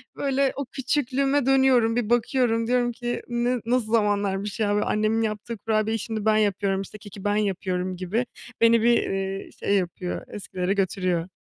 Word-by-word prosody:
Böyle, 275 -1 +1
o 280 - -3
küçüklüğüme 275 +1 0
dönüyorum. 260 -4 +4
Bir 240 -3 -1
bakıyorum, 240 -1 +2
diyorum 245 0 +2
ki, 240 +1 -4
"N 240 0 -1
ne, 235 - -8
nasıl 235 -2 0
zamanlarmış 205 -1 0
ya?" 205 -2 +2
Böyle, 210 - +1
annemin 215 +1 +1
yaptığı 220 +1 -3
kurabiyeyi 220 +1 0
şimdi 220 0 -4
ben 215 0 +4
yapıyorum, 200 -2 +1
işte 195 +2 -9
keki 205 -2 -11
ben 205 0 +1
yapıyorum 185 -3 -1
gibi. 200 +7 -1 0.4
Beni 230 0 +5
bir, 235 +1 +3
ııı, 195 0 -3
şey 200 - -1
yapıyor, 180 -1 -2
eskilere 190 -2 -3
götürüyor. 185 -3 0
215 Hz, 170 wpm, -25 LUFS, 195-240 Hz, 0.4 s, Beni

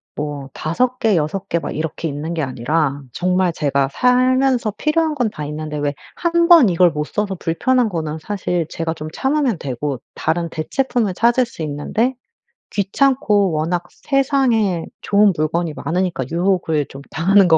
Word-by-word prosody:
뭐 145 -2 -5
5 250 +11 -1
개, 220 -3 +3
6 175 +6 -2
개 170 - +1
막 - - -5
이렇게 160 +1 -3
있는 150 +3 -4
게 165 - -2
아니라 140 +3 -1
정말 180 0 +1
제가 140 -3 0
살면서 255 - +2
필요한 315 +4 +1
건 245 -5 +1
다 150 -7 -6
있는데 150 0 -5
왜 145 0 -1 0.2
1 340 0 +2
번 325 - +8
이걸 175 0 +4
못 150 -1 -2
써서 200 +2 -2
불편한 235 +9 +1
거는 160 -4 -3
사실 180 -2 -2
제가 165 -1 -3
좀 155 -1 -7
참으면 265 - +1
되고 135 -1 -3
다른 170 +1 -1
대체품을 220 - -1
찾을 240 +6 +3
수 230 - -11
있는데 155 - -1 0.6
귀찮고 210 -1 +2
워낙 170 +3 0
세상에 260 - +1 0.2
좋은 205 -1 +4
물건이 160 +1 -1
많으니까 175 -5 -2
유혹을 170 -4 +1
좀 135 - -10
당하는 190 +4 +4
것 160 -1 +6
180 Hz, 295 characters per minute, -19 LUFS, 155-235 Hz, 0.6 s, 번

